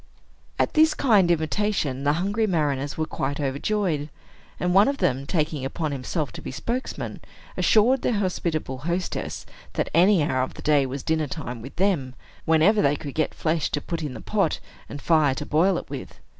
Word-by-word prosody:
At - - +1
this 315 0 +5
kind 210 -9 +4
invitation, 160 -4 0
the 145 - +4
hungry 200 +7 0
mariners 145 -6 -1
were 160 - 0
quite 140 -2 -3
overjoyed; 150 +2 -1 0.5
and 180 0 0
one 200 +2 +6
of 280 0 0
them, 135 - 0
taking 155 -4 -1
upon 150 +3 -2
himself 140 +1 -3
to - - -9
be - - -6
spokesman, 235 - -4 0.4
assured 240 +5 +4
their - - +1
hospitable 170 -8 -2
hostess 170 +5 -3 0.3
that - - -2
any 180 0 +5
hour 130 -4 0
of 130 - -3
the - - -10
day 145 -3 +3
was 135 +1 -5
dinner 160 -2 0
time 125 -5 -6
with 135 +4 -10
them, 170 -10 0 0.3
whenever 165 +7 +4
they 145 -5 +3
could 145 -1 -7
get 155 - -1
flesh 160 -1 0
to 145 - -1
put 165 +3 -4
in 145 -5 -4
the - - -8
pot, 200 -7 0 0.3
and 145 - -8
fire 155 -5 +3
to 150 - -4
boil 175 +5 +3
it - - -6
with. 140 -2 -8
155 Hz, 185 wpm, -24 LUFS, 140-190 Hz, 0.5 s, one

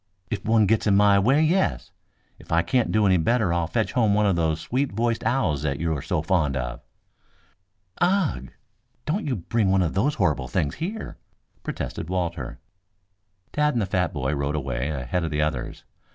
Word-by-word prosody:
"If 110 - -3
one 110 -1 +3
gets 110 +1 +1
in 100 - +4
my 100 0 +5
way, 135 +10 +3
yes. 180 +5 +1 0.5
If - - -14
I 85 +1 +3
can't 115 +7 +1
do 110 -1 +3
any 95 -2 +4
better 95 +2 +1
I'll 85 -2 0
fetch 110 - -1
home 110 -6 +3
one 105 0 +3
of 100 -3 +3
those 80 -1 0
sweet 130 - -1
voiced 115 +2 -1
owls 95 - +1
that 70 -2 -2
you 80 -1 0
are 70 - -4
so 75 - -1
fond 80 -7 +1
of." - - -4 1.2
"Ugh! 175 - +1 0.6
Don't 175 +4 -1
you 130 - 0
bring 105 +2 0
one 95 -1 +3
of 85 - -1
those 130 +10 +1
horrible 75 - 0
things 75 -1 -1
here," 210 +7 -5 0.4
protested 80 - -5
Walter. 90 -2 -3 1.0
Tad 150 -1 +1
and 115 - +1
the - - 0
fat 90 -2 0
boy 70 -1 -2
rode 70 +1 -1
away 65 -1 -2
ahead 70 +4 -2
of 80 - -1
the 75 -1 0
others. 75 -5 -3
95 Hz, 190 wpm, -24 LUFS, 75-115 Hz, 1.2 s, my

